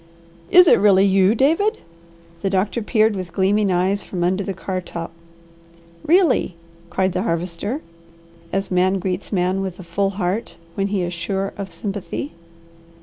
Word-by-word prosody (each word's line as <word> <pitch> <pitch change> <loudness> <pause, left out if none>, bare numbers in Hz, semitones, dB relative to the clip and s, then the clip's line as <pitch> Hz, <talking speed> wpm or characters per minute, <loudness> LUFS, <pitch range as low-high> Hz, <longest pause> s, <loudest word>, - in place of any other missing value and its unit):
"Is 360 0 +7
it - - +6
really 195 -1 +5
you, 195 +2 +4
David?" 330 - +2 0.6
the 195 - 0
doctor 195 +3 0
peered 215 -1 +2
with 185 -2 -5
gleaming 200 +1 +2
eyes 185 +3 +1
from 180 -2 -4
under 185 +3 +1
the 195 - -3
car 185 0 -3
top. 170 -2 -7 0.9
"Really!" 330 - +3 0.3
cried 190 0 0
the 180 +1 -1
Harvester, 185 - -2 0.7
as 195 0 -2
man 185 +1 +2
greets 185 0 -3
man 185 0 0
with 190 -2 -4
a 185 - -9
full 195 +4 -1
heart 190 +3 -2 0.2
when 195 0 -1
he 200 -2 -1
is 175 0 -3
sure 195 +3 -3
of 195 -2 -6
sympathy. 200 - -5
195 Hz, 155 wpm, -21 LUFS, 185-205 Hz, 0.9 s, Is